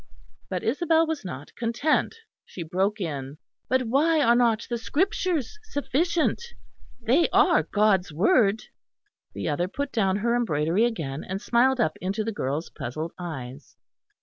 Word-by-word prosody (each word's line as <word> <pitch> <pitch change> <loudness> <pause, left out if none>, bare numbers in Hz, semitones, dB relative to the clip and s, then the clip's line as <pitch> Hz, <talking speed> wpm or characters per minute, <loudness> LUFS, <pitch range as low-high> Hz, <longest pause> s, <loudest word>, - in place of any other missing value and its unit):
But - - -3
Isabel 325 +6 +2
was 320 -4 -3
not 145 -6 -8
content. 240 - 0 0.3
She 175 - -8
broke 190 +6 -1
in: 145 -5 -4 0.3
"But 260 0 +2
why 295 +7 +2
are 235 -5 +5
not 235 -2 +2
the 240 -1 -3
Scriptures 360 - -1
sufficient? 335 - 0 0.6
They 255 +8 +2
are - - +4
God's 205 -4 +1
Word." 205 - +3 0.7
The - - -3
other 165 +4 0
put 280 +8 -4
down 195 -4 +1
her 235 +4 +1
embroidery 180 -2 +1
again, 155 - -3
and 190 +1 -4
smiled 250 +4 +2
up 155 -9 +1
into 195 +4 -2
the 225 - -2
girl's 150 -4 -3
puzzled 155 +7 -5
eyes. 135 -6 -8
220 Hz, 145 wpm, -25 LUFS, 170-265 Hz, 0.7 s, are